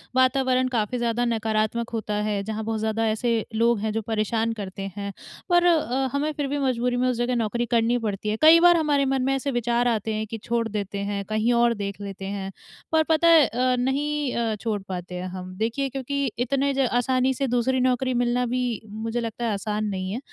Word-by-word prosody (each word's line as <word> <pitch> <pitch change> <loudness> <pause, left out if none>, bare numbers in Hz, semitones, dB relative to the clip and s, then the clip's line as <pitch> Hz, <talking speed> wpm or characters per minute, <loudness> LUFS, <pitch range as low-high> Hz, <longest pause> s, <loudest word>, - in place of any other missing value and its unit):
वातावरण 255 0 +3
काफ़ी 245 -1 -1
ज़्यादा 240 0 0
नकारात्मक 225 0 0
होता 220 -2 -3
है, 210 -1 -1
जहाँ 220 +1 -4
बहुत 220 0 -2
ज़्यादा 220 +1 0
ऐसे 225 +1 0
लोग 230 0 +3
हैं 215 +1 -1
जो 225 - -1
परेशान 220 +1 -1
करते 195 -2 -6
हैं। 200 0 -4 0.4
पर 350 0 +4
अ, 270 -6 +2
हमें 290 +2 0
फिर 290 -1 -2
भी 285 +2 -2
मजबूरी 250 -2 0
में 250 +1 +1
उस 250 - -1
जगह 240 +1 0
नौकरी 235 +1 -1
करनी 235 +1 +2
पड़ती 210 -2 -3
है, 215 - -1
कई 320 +2 +8
बार 345 0 +6
हमारे 295 -3 +2
मन 270 0 0
में 270 - +2
ऐसे 275 +1 -2
विचार 240 0 +1
आते 220 -2 0
हैं 215 0 -2
कि 225 - -5
छोड़ 235 -1 0
देते 200 -1 -4
हैं 200 -1 -2
कहीं 215 +2 +1
और 235 0 +3
देख 200 -2 -5
लेते 195 -1 -6
है। 195 0 -4 0.4
पर 320 0 +4
पता 320 +1 +4
है 325 -3 +7
अ, 250 +2 +1
नहीं 285 +2 -1
अ, 230 -2 0
छोड़ 210 -1 -3
पाते 180 -1 -5
हैं 180 +1 -4
हम, 185 0 -7
देखिए 235 +6 -1
क्योंकि 275 +2 -2
इतने 275 +3 +1
ज 270 -1 +2
आसानी 255 +1 +2
से 275 +2 -1
दूसरी 245 +2 +1
नौकरी 255 0 +1
मिलना 245 0 +1
भी 250 +1 -1 0.2
मुझे 225 +3 -4
लगता 230 0 -4
है 230 - 0
आसान 210 +1 -2
नहीं 185 0 -3
है। 225 - -3
235 Hz, 215 wpm, -24 LUFS, 215-260 Hz, 0.4 s, कई